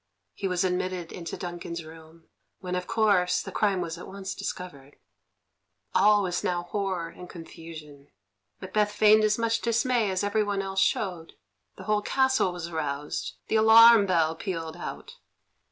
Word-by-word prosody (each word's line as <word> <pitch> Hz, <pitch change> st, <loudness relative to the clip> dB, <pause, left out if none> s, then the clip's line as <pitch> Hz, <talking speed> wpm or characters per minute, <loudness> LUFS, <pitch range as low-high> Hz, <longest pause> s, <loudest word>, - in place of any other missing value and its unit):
He 195 Hz, -, -3 dB
was 180 Hz, 0 st, 0 dB
admitted 185 Hz, -2 st, -2 dB
into 170 Hz, -2 st, -6 dB
Duncan's 175 Hz, -2 st, -6 dB
room, 160 Hz, +1 st, -14 dB, 0.4 s
when, 180 Hz, -1 st, -5 dB
of 180 Hz, 0 st, -3 dB
course, 200 Hz, -5 st, +2 dB
the -, -, -6 dB
crime 200 Hz, -3 st, +1 dB
was 165 Hz, 0 st, -5 dB
at -, -, -9 dB
once 195 Hz, 0 st, -6 dB
discovered. 145 Hz, -6 st, -7 dB, 1.0 s
All 210 Hz, 0 st, +4 dB
was 180 Hz, -1 st, -2 dB
now 175 Hz, -1 st, -1 dB
horror 185 Hz, -2 st, -3 dB
and 180 Hz, +1 st, -12 dB
confusion. 160 Hz, -4 st, -11 dB, 0.5 s
Macbeth 210 Hz, +2 st, 0 dB
feigned 215 Hz, 0 st, +5 dB
as 210 Hz, 0 st, +2 dB
much 230 Hz, 0 st, 0 dB
dismay 235 Hz, -1 st, +1 dB
as 185 Hz, 0 st, -1 dB
everyone 205 Hz, -1 st, 0 dB
else 195 Hz, 0 st, -3 dB
showed. 175 Hz, -5 st, -1 dB, 0.4 s
The -, -, -9 dB
whole 210 Hz, -1 st, +1 dB
castle 265 Hz, -4 st, +1 dB
was 175 Hz, -1 st, -6 dB
aroused; 150 Hz, -3 st, -4 dB
the 220 Hz, -, +1 dB
alarum 220 Hz, -1 st, +7 dB
bell 165 Hz, -3 st, +2 dB
pealed 165 Hz, -2 st, -5 dB
out. 470 Hz, -, -8 dB
185 Hz, 155 wpm, -27 LUFS, 170-210 Hz, 1.0 s, alarum